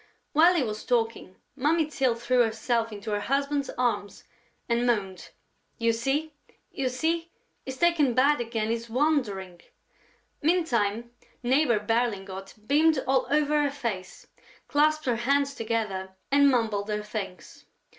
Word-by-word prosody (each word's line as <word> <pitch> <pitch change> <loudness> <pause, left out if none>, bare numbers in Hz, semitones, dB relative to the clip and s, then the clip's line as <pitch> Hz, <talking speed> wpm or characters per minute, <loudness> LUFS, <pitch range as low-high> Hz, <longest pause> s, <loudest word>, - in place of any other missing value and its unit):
While 335 +4 +6
he 320 - +2
was 215 -2 -4
talking, 230 -5 -1 0.2
Mummy 305 +4 +2
Tyl 270 -5 0
threw 240 +2 0
herself 230 0 0
into 210 +1 -6
her 205 - 0
husband's 280 +4 -1
arms 240 -5 -1 0.4
and 235 +1 +1
moaned: 195 -6 -1 0.5
"You 230 -1 +2
see?... 275 +7 -1 0.4
You 265 -2 -1
see?... 330 +6 -1 0.4
He's 265 0 -6
taken 305 -6 +3
bad 280 +1 +4
again.... 225 -2 -2
He's 230 0 -3
wandering...." 225 - -1 0.8
Meantime, 235 - +1 0.3
Neighbor 255 -1 +3
Berlingot 200 -4 -2
beamed 310 +5 +4
all 265 0 +2
over 300 0 +2
her 290 - +1
face, 230 -10 -5 0.4
clasped 310 +1 +2
her 245 -3 +1
hands 280 +4 +1
together 215 -6 -3 0.2
and 280 0 +6
mumbled 220 -5 0
her 210 0 -2
thanks. 195 -6 -7
240 Hz, 135 wpm, -27 LUFS, 215-285 Hz, 0.8 s, While